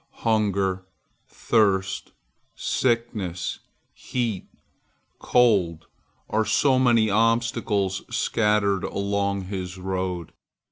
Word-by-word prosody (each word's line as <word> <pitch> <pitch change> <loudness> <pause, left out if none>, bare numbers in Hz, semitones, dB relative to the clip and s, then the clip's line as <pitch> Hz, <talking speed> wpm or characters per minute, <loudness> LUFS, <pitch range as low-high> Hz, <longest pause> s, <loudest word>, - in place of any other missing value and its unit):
Hunger, 100 -4 +1 0.4
thirst, 100 -4 0 0.4
sickness, 115 -8 -1 0.3
heat, 115 -7 -3 0.7
cold, 95 -10 +2 0.4
are 110 +1 +1
so 130 +5 +3
many 120 -4 +4
obstacles 115 -3 +1
scattered 105 -3 +1
along 100 0 -1
his 95 -1 -5
road. 90 -2 -3
100 Hz, 75 wpm, -24 LUFS, 95-115 Hz, 0.7 s, many